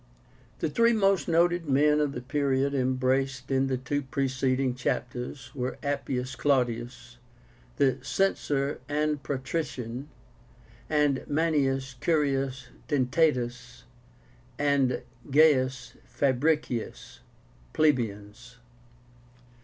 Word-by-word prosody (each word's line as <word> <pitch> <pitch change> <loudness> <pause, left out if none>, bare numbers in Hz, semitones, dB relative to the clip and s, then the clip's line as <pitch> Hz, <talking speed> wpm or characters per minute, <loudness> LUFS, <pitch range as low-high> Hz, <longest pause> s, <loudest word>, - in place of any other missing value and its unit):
The - - +1
three 230 +6 +4
most 195 -4 +2
noted 170 -1 +2
men 150 +2 +4
of 145 -2 0
the 120 - -6
period 140 0 0
embraced 130 0 0
in 135 0 +2
the 130 -1 0
two 135 +3 -2
preceding 130 -1 0
chapters 125 +1 -4
were 130 -1 -3
Appius 135 -3 -2
Claudius, 120 -3 -1 0.6
the 135 -1 +2
Censor 145 -7 0
and 150 0 0
patrician; 135 -2 -4 0.8
and 150 -3 +2
Manius 140 -4 0
Curius 135 -5 0 0.2
Dentátus 125 - 0 0.7
and 140 -4 +1 0.3
Gaius 130 -4 +3
Fabricius, 140 -2 -1 0.5
plebeians. 120 - -1
135 Hz, 90 wpm, -27 LUFS, 125-150 Hz, 0.8 s, three